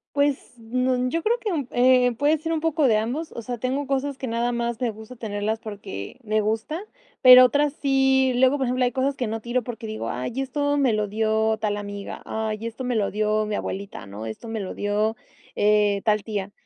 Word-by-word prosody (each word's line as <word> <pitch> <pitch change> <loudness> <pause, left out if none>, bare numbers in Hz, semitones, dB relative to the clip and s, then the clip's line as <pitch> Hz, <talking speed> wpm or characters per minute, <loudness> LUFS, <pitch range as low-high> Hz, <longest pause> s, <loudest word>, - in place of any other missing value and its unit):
Pues, 285 -1 0
n 250 +2 0
yo 330 +2 -2
creo 475 +2 +2
que 425 - -2
un, 290 -7 -1
eh, 250 0 +4
puede 290 +6 +2
ser 325 +2 -3
un 320 - 0
poco 320 -3 +2
de 220 -3 +4
ambos, 260 +9 -3
o 230 - -6
sea, 245 +1 -5
tengo 265 +4 -2
cosas 275 0 -1
que 260 - -5
nada 235 +1 0
más 235 0 -2
me 240 -2 0
gusta 220 +3 -11
tenerlas 215 -1 -2
porque 205 - -8
me 215 -1 +1
gusta 225 +9 -2 0.4
pero 255 -1 +10
otras 285 +3 +2
sí 265 -2 +2
luego 260 +3 +4
por 265 -2 -1
ejemplo 250 +1 +1
hay 245 - +1
cosas 270 +2 0
que 245 - -2
no 225 +1 -3
tiro 240 +1 -1
porque 235 -2 -6
digo: 215 - -4
"Ay 125 - -3
esto 285 +2 0
me 260 -5 +3
lo 210 -1 0
dio 220 +1 +1
tal 205 -1 0
amiga, 205 -1 -6
ay 220 0 -3
esto 230 +3 -5
me 250 -1 -1
lo 205 -3 +1
dio 215 +1 +1
mi 210 - -2
abuelita, 195 - -5
¿no? 100 +3 -8
esto 110 - -7
me 225 -1 -4
lo 190 - -4
dio 210 +2 0 0.4
eh, 205 -1 +3
tal 210 -2 +2
tía". 205 -2 -4
235 Hz, 220 wpm, -24 LUFS, 215-265 Hz, 0.4 s, pero